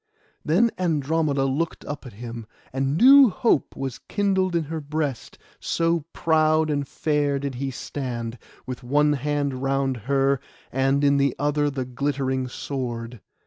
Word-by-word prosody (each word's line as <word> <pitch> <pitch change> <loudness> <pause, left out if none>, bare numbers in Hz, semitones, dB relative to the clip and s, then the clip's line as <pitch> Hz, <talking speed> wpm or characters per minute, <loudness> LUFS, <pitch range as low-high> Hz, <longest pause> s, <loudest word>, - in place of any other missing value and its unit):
Then 205 +10 +3
Andromeda 155 -4 +1
looked 145 +5 -2
up 145 -2 -6
at 120 - -11
him, 115 +1 -8 0.3
and 135 +2 0
new 270 +3 +8
hope 205 - +1
was 135 -2 -4
kindled 190 -3 0
in 165 - +2
her 160 +1 -5
breast, 145 -4 -3 0.2
so 165 -2 0
proud 155 -1 +2
and 145 -1 -1
fair 145 -2 0
did 140 0 -3
he 135 +2 -3
stand, 120 -3 -5 0.3
with 130 0 -6
one 150 +4 +2
hand 140 -1 -1
round 135 -1 0
her, 135 -1 +3 0.3
and 135 +2 +1
in 140 0 +4
the 140 -2 +2
other 145 0 +1
the 135 -2 -3
glittering 130 0 -1
sword. 120 -3 -5
140 Hz, 145 wpm, -24 LUFS, 130-155 Hz, 0.3 s, new